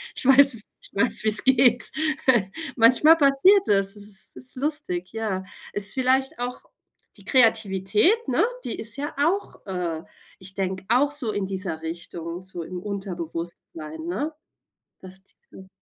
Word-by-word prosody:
Ich -, -, -5 dB
weiß 270 Hz, 0 st, +7 dB, 0.3 s
ich -, -, -4 dB
weiß, 220 Hz, +2 st, +3 dB
wie 215 Hz, -, +1 dB
es 215 Hz, -, +8 dB
geht 250 Hz, -2 st, +6 dB, 0.8 s
Manchmal 255 Hz, +7 st, +5 dB
passiert 295 Hz, +8 st, +4 dB
das, 195 Hz, -1 st, +1 dB
das 205 Hz, -, -8 dB
ist 205 Hz, -2 st, -4 dB
ist 255 Hz, 0 st, -13 dB
lustig, 270 Hz, -, -3 dB
ja. 215 Hz, -4 st, -4 dB, 0.3 s
Ist 200 Hz, -1 st, +4 dB
vielleicht 265 Hz, +3 st, 0 dB
auch 245 Hz, +1 st, -5 dB, 0.6 s
die -, -, -18 dB
Kreativität, 220 Hz, -, +1 dB
ne? -, -, +1 dB, 0.2 s
Die -, -, -5 dB
ist 220 Hz, +1 st, 0 dB
ja 290 Hz, +1 st, -6 dB
auch, 335 Hz, +8 st, -2 dB
äh 175 Hz, -4 st, -4 dB, 0.4 s
ich 190 Hz, 0 st, -9 dB
denke 190 Hz, 0 st, -4 dB
auch 255 Hz, +5 st, +2 dB
so 265 Hz, -7 st, -2 dB
in 205 Hz, -2 st, -3 dB
dieser 185 Hz, -4 st, -5 dB
Richtung, 170 Hz, +1 st, -7 dB
so 185 Hz, -2 st, -8 dB
im 180 Hz, +2 st, -8 dB
Unterbewusstsein, 170 Hz, -5 st, -7 dB
ne? 275 Hz, -, -4 dB, 0.7 s
Dass 190 Hz, 0 st, -9 dB
diese 190 Hz, -1 st, -18 dB
205 Hz, 150 wpm, -23 LUFS, 185-265 Hz, 0.8 s, es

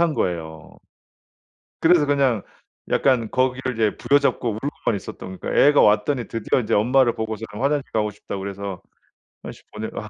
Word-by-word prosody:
한 170 Hz, -3 st, +2 dB
거예요. 80 Hz, -3 st, -4 dB, 1.0 s
그래서 165 Hz, -2 st, +5 dB
그냥 135 Hz, -7 st, +2 dB, 0.5 s
약간 125 Hz, -5 st, +2 dB
거기를 130 Hz, 0 st, 0 dB
이제 110 Hz, -2 st, 0 dB
부여잡고 140 Hz, -3 st, +2 dB
울고만 115 Hz, 0 st, -3 dB
있었던 95 Hz, -1 st, -9 dB
그니까 -, -, -5 dB
애가 145 Hz, 0 st, +6 dB
왔더니 110 Hz, +5 st, +2 dB
드디어 115 Hz, +3 st, 0 dB
인제 110 Hz, -, -2 dB
엄마를 120 Hz, +3 st, +3 dB
보고서는 110 Hz, -1 st, -5 dB
화장실 140 Hz, 0 st, 0 dB
가고 105 Hz, -1 st, 0 dB
싶다고 100 Hz, -1 st, -7 dB
그래서 100 Hz, -2 st, -6 dB, 0.6 s
화장실 -, -, -10 dB
보내 110 Hz, +1 st, -5 dB
아 105 Hz, -, -6 dB
115 Hz, 375 characters per minute, -22 LUFS, 105-135 Hz, 1.0 s, 애가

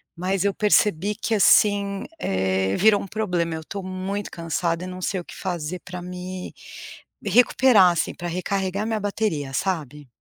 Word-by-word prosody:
mas 185 Hz, +2 st, -1 dB
eu 200 Hz, -, +2 dB
percebi 210 Hz, -2 st, +2 dB
que 225 Hz, +1 st, -2 dB
assim, 200 Hz, -1 st, +4 dB
eh, 95 Hz, 0 st, 0 dB
virou 210 Hz, +1 st, +4 dB
um -, -, -7 dB
problema, 180 Hz, -6 st, -1 dB
eu 160 Hz, -, -6 dB
tô 200 Hz, -, -6 dB
muito 190 Hz, +2 st, -4 dB
cansada 170 Hz, +1 st, -2 dB
e -, -, -6 dB
não 185 Hz, 0 st, -7 dB
sei 185 Hz, +1 st, -1 dB
o 175 Hz, -, -9 dB
que -, -, -11 dB
fazer 175 Hz, -2 st, -4 dB
pra 180 Hz, 0 st, -7 dB
me 180 Hz, 0 st, -7 dB, 0.7 s
recuperar, 220 Hz, -2 st, +5 dB
assim, 170 Hz, -, -1 dB
pra 175 Hz, -, -5 dB
recarregar 190 Hz, +3 st, -2 dB
minha 220 Hz, -1 st, -1 dB
bateria, 200 Hz, -9 st, -2 dB
sabe. 150 Hz, -6 st, -3 dB
185 Hz, 165 wpm, -23 LUFS, 170-200 Hz, 0.7 s, recuperar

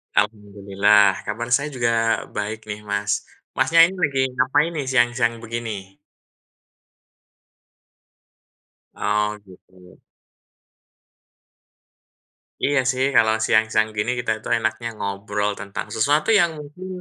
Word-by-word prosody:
Alhamdulillah 100 Hz, -1 st, +2 dB
kabar 120 Hz, +3 st, -4 dB
saya 140 Hz, +5 st, +3 dB
juga 115 Hz, -2 st, +1 dB
baik 105 Hz, +1 st, -4 dB
nih 105 Hz, -, -6 dB
Mas. 100 Hz, 0 st, -1 dB, 0.2 s
Masnya 165 Hz, 0 st, +5 dB
ini 180 Hz, +3 st, +2 dB
lagi 145 Hz, -6 st, 0 dB
ngapain 135 Hz, +6 st, +1 dB
nih 150 Hz, -5 st, -4 dB
siang-siang 120 Hz, -2 st, +1 dB
begini? 110 Hz, -4 st, -6 dB, 3.0 s
Oh 105 Hz, 0 st, -1 dB
gitu. 90 Hz, -1 st, -18 dB, 2.7 s
Iya 145 Hz, -1 st, +2 dB
sih 130 Hz, 0 st, -1 dB
kalau 110 Hz, 0 st, +5 dB
siang-siang 110 Hz, -1 st, +2 dB
gini, 105 Hz, +4 st, 0 dB
kita 120 Hz, -2 st, -1 dB
itu -, -, -10 dB
enaknya 110 Hz, +1 st, -2 dB
ngobrol 100 Hz, +1 st, -2 dB
tentang 100 Hz, 0 st, -6 dB
sesuatu 145 Hz, -, +2 dB
yang 170 Hz, -2 st, +3 dB
mungkin, 150 Hz, +6 st, -10 dB
110 Hz, 100 wpm, -22 LUFS, 105-130 Hz, 3.0 s, Masnya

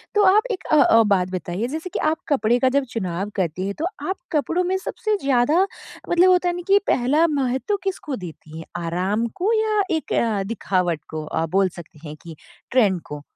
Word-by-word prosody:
तो 415 Hz, -, +5 dB
आप 400 Hz, +3 st, +5 dB
एक 390 Hz, -, -4 dB
अ -, -, +5 dB
अ, 230 Hz, -, +5 dB
बात 195 Hz, -4 st, +1 dB
बताइए 185 Hz, +4 st, -3 dB
जैसे 315 Hz, +7 st, -5 dB
कि -, -, -1 dB
आप 320 Hz, -, -2 dB
कपड़े 245 Hz, -4 st, +2 dB
का 260 Hz, -, +3 dB
जब 280 Hz, -, +2 dB
चुनाव 190 Hz, -2 st, -3 dB
करती 185 Hz, 0 st, -1 dB
हैं 200 Hz, -, -2 dB
तो -, -, +1 dB, 0.2 s
आप 380 Hz, -, 0 dB, 0.2 s
कपड़ों 330 Hz, +4 st, 0 dB
में 370 Hz, +1 st, 0 dB
सबसे 425 Hz, +2 st, -2 dB
ज़्यादा 275 Hz, +7 st, +3 dB, 0.4 s
मतलब 350 Hz, +2 st, +5 dB
होता 360 Hz, -1 st, +3 dB
है 350 Hz, -, -2 dB
ना 355 Hz, -, -5 dB
कि 400 Hz, +1 st, +5 dB
पहला 280 Hz, +7 st, +3 dB
महत्व 275 Hz, +5 st, 0 dB
किसको 370 Hz, -7 st, -3 dB
देती 160 Hz, -5 st, -10 dB
हैं? 165 Hz, -, -8 dB, 0.2 s
आराम 185 Hz, +7 st, -1 dB
को 420 Hz, +5 st, +2 dB
या 435 Hz, -1 st, +2 dB, 0.2 s
एक 315 Hz, -, -5 dB, 0.3 s
दिखावट 180 Hz, -7 st, -1 dB
को 155 Hz, -1 st, -5 dB
अ, 160 Hz, +1 st, -1 dB
बोल 190 Hz, +4 st, +2 dB
सकते 155 Hz, -2 st, -13 dB
हैं 150 Hz, -, -7 dB
कि 165 Hz, -2 st, -9 dB, 0.4 s
ट्रेंड 205 Hz, -8 st, +3 dB
को? 150 Hz, 0 st, -7 dB
245 Hz, 200 wpm, -22 LUFS, -, 0.4 s, तो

